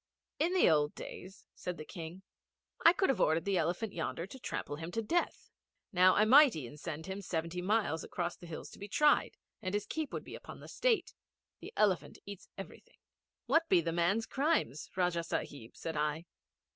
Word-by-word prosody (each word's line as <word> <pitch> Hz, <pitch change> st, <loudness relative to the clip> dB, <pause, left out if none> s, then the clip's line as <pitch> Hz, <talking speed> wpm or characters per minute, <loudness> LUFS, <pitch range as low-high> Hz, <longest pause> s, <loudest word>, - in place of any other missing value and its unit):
'In 340 Hz, +5 st, +2 dB
the 370 Hz, -, +5 dB
old 150 Hz, -2 st, +3 dB
days,' 190 Hz, +1 st, -9 dB
said 180 Hz, -1 st, -5 dB
the 155 Hz, -, -7 dB
King, 170 Hz, +2 st, -8 dB, 0.6 s
'I 335 Hz, -, +9 dB
could 380 Hz, +1 st, +1 dB
have 240 Hz, -9 st, +2 dB
ordered 160 Hz, +2 st, +3 dB
the 195 Hz, -2 st, +2 dB
Elephant 175 Hz, +6 st, -1 dB
yonder 165 Hz, 0 st, -3 dB
to 260 Hz, +8 st, -11 dB
trample 145 Hz, -10 st, -4 dB
him 165 Hz, +1 st, -6 dB
to 225 Hz, -, -1 dB
death. 345 Hz, +11 st, -1 dB, 0.4 s
Now 185 Hz, +1 st, +6 dB
I 210 Hz, -, +5 dB
must 275 Hz, +4 st, +7 dB
e'en 145 Hz, -3 st, -6 dB
send 160 Hz, 0 st, -6 dB
him 190 Hz, +1 st, -5 dB
seventy 170 Hz, -1 st, -3 dB
miles 200 Hz, -4 st, +1 dB
across 175 Hz, -1 st, -3 dB
the 175 Hz, -, -12 dB
hills 165 Hz, -, -7 dB
to -, -, -13 dB
be 200 Hz, -, -6 dB
tried, 295 Hz, +8 st, +3 dB, 0.2 s
and 185 Hz, -1 st, -2 dB
his 205 Hz, 0 st, -1 dB
keep 310 Hz, +5 st, -3 dB
would -, -, -4 dB
be -, -, -10 dB
upon -, -, -9 dB
the -, -, -11 dB
State. 485 Hz, -3 st, +1 dB, 0.5 s
The -, -, -9 dB
Elephant 180 Hz, -9 st, +2 dB
eats 200 Hz, -1 st, -9 dB
everything.' -, -, -10 dB, 0.5 s
'What 330 Hz, 0 st, +2 dB
be -, -, +6 dB
the 165 Hz, 0 st, -1 dB
man's 185 Hz, +7 st, +2 dB
crimes, 275 Hz, -, 0 dB
Rajah 175 Hz, -2 st, +1 dB
Sahib?' 140 Hz, -7 st, -5 dB
said 165 Hz, -1 st, -4 dB
I. 150 Hz, +2 st, -1 dB
180 Hz, 195 wpm, -33 LUFS, 165-220 Hz, 0.6 s, I